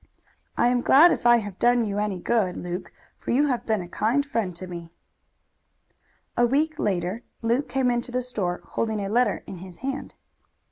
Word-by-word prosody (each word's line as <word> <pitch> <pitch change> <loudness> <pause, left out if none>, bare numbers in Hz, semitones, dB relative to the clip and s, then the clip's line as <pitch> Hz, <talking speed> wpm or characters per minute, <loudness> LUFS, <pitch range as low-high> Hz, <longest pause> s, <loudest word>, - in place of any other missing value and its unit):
"I 240 - +4
am 245 0 +2
glad 315 +8 +7
if - - +1
I 240 0 +7
have 205 -4 -6
done 240 -1 +3
you 205 -1 -2
any 210 -2 -1
good, 190 -1 0
Luke, 180 +1 -5 0.3
for - - -8
you 280 +5 +3
have 250 -4 -1
been 215 -4 +1
a - - -9
kind 235 +10 +1
friend 225 -10 -2
to 185 - -7
me." 170 -2 -8 1.5
A 240 - +3
week 305 +5 0
later 185 +2 -1 0.2
Luke 240 +5 +1
came 265 -2 +1
into 240 +1 -2
the 250 +1 -1
store, 195 -8 -2
holding 220 -2 -1
a 195 -1 -3
letter 230 -1 +1
in 190 - -8
his 180 0 -10
hand. 275 +1 -4
230 Hz, 190 wpm, -25 LUFS, 190-250 Hz, 1.5 s, glad